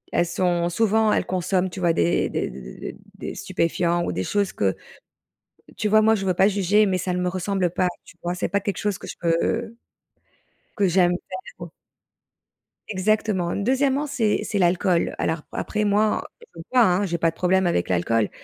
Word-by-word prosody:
Elles 175 - +3
sont 175 -1 0
souvent, 220 +3 +2
elles - - +1
consomment, 185 0 0
tu 190 - -7
vois, 170 -2 +3
des 85 - +1
des - - -2
des 65 - -9
des 60 - -9
des - - -6
des - - -16 0.3
des - - -7
stupéfiants 170 +1 0
ou - - -2
des 90 +1 -2
choses 200 - 0
que 95 -2 0 1.0
tu 210 - -1
vois, 215 +1 +5
moi, 220 +1 +4
je 195 -3 -2
veux 185 - +2
pas 190 +3 +4
juger, 205 +1 +3
mais 185 -2 +1
ça 180 0 -2
ne 180 - -1
me 180 - 0
ressemble 185 0 -1
pas, 180 +1 +1 0.2
tu - - -16
vois? 175 +1 -2
C'est 180 - -2
pas 200 0 0
quelque 200 0 -3
chose 205 -3 -1
que - - -10
je - - -7
peux 220 +8 0 1.0
que 200 -2 +3
j'aime 175 0 +4
faire, 375 - -6
quoi. - - -9 1.2
Exactement. 195 -2 0
2°, 265 +6 +1
c'est 235 -7 0
c'est 205 - -2
l'alcool. 175 0 +2
Alors, 160 0 -1
après, 215 0 -2
moi, 210 +1 +2
en - - -10 0.2
écoute, 165 -1 -13
hein, 205 -5 +4
j'ai 170 -2 -2
pas 165 0 +2
de 165 - -9
problème 190 +1 +2
avec 130 - +1
l'alcool 105 +5 +1
185 Hz, 200 wpm, -23 LUFS, 175-210 Hz, 1.2 s, vois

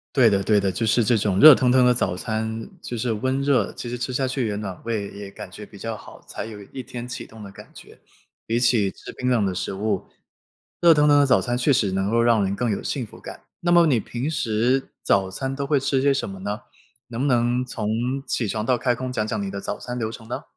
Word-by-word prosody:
对 120 -4 +6
的， 100 -1 +1
对 105 -2 +3
的， 100 -1 0
就 115 +4 -2
是 110 +1 +3
这 120 - +3
种 100 -2 0
热 155 -3 +11
腾 125 -1 +2
腾 130 -1 +5
的 125 - +5
早 90 -6 -1
餐， 110 +1 -3
就 120 - -5
是 115 0 -1
温 130 +5 -1
热， 140 -2 +2
其 120 - -6
实 120 - -4
吃 130 - -3
下 130 +1 0
去 130 -2 -1
也 105 -1 -2
暖 100 -4 -5
胃 110 -3 -2
也 100 -1 -9
感 - - -9
觉 - - -10
比 - - -15
较 - - -4
好， - - -13
才 - - -5
有 105 -2 -9
一 130 -2 -5
天 120 -1 -7
启 120 - -6
动 110 -1 -13
的 100 - -9
感 - - -13
觉。 - - -14 0.5
比 115 +1 0
起 115 -5 +2
吃 - - -11
冰 125 0 -2
冷 115 -5 +2
的 95 -1 -2
食 - - -3
物， 100 0 -2 0.7
热 170 -1 +7
腾 150 0 +3
腾 145 0 +6
的 140 - +5
早 130 - +4
餐 120 0 -1
确 130 +3 +2
实 100 -7 +2
能 95 +1 0
够 115 0 +3
让 115 -3 +3
人 95 +1 -1
更 120 +3 -1
有 100 - -2
幸 130 -5 -2
福 - - -15
感。 - - -9 0.2
那 175 0 +1
么 170 -1 +6
你 120 -7 +2
平 125 +6 -4
时 125 -1 0
早 95 -1 +1
餐 135 +6 -3
都 140 0 -3
会 140 -1 +2
吃 135 0 0
些 140 0 +3
什 135 - -2
么 95 -1 -8
呢？ 100 +3 -4 0.5
能 120 +1 -5
不 145 - +1
能 120 0 +2
从 110 -4 -4 0.4
起 115 -5 -1
床 110 +1 -2
到 125 0 +2
开 125 +1 +1
工 125 +1 -5
讲 110 -2 -1
讲 110 -1 -2
你 100 - -3
的 100 0 -5
早 - - -4
餐 125 0 -6
流 110 -2 -2
程 110 -1 -11
呢？ 120 - -5
120 Hz, 285 characters per minute, -23 LUFS, 105-130 Hz, 0.7 s, 热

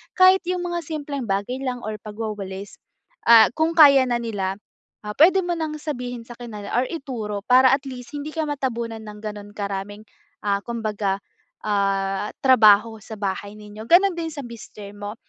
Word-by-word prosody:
Kahit 370 +1 +6
'yung 360 -1 -1
mga 345 -1 -3
simpleng 285 -4 -5
bagay 200 +6 -2
lang 250 -2 -3
or 215 0 -4
pagwawalis, 205 -2 -6 0.5
ah, 225 -2 +9
kung 320 +1 +1
kaya 280 -5 +8
na 240 -1 0
nila, 200 -5 -3 0.5
ah, 210 0 -5
puwede 370 +5 +6
mo 350 0 -1
ng 305 -1 -3
sabihin 245 -6 -5
sa 240 - -10
kanila 210 -4 -8
or 255 - 0
ituro 235 -10 -5
para 255 +1 +6
at 275 +1 +2
least 250 0 -8
hindi 290 +1 -5
ka 315 -1 -1
matabunan 235 -6 -3
ng 210 -1 -10
gano'n 205 -1 -7
karaming, 200 +1 -5 0.4
ah, 200 0 +1
kumbaga, 215 -4 -2 0.5
ah, 195 -1 0
trabaho 220 -4 +6
sa 220 -2 -9
bahay 200 +1 -4
ninyo 210 +1 -10
gano'n 370 +1 +5
din 330 -1 -4
sa 295 - -7
mister 215 -3 -10
mo 205 +1 -7
230 Hz, 170 wpm, -23 LUFS, 205-285 Hz, 0.5 s, ah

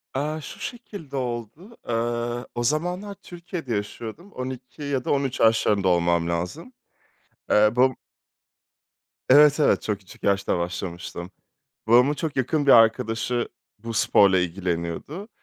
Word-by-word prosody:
Eee, 150 +3 -2
şu - - -10
şekilde 205 - -7
oldu: 125 - -5
Eee, 120 +1 -2
o 120 - -1
zamanlar 180 - -1
Türkiye'de 175 - -6
yaşıyordum, 115 - -6
12 130 +1 -7
ya 140 -3 -2
da - - 0
13 135 -2 0
yaşlarında 105 -3 +3
olmam 85 -1 +2
lazım. 90 - -4 0.8
Eee, 105 0 +6
bab 130 +1 +4 1.4
Evet, 145 +2 +7
evet, 150 - +3
çok 105 -2 -2
küçük 95 -1 -17
yaşta 100 -2 +1
başlamıştım. 85 0 -5 0.6
Babamın 125 +6 +5
çok 155 0 -4
yakın 140 +3 0
bir - - +6
arkadaşı 115 +1 +3 0.3
bu 115 +2 -7
sporla 100 -3 +4
ilgileniyordu. 90 - -3
120 Hz, 125 wpm, -24 LUFS, 100-150 Hz, 1.4 s, Evet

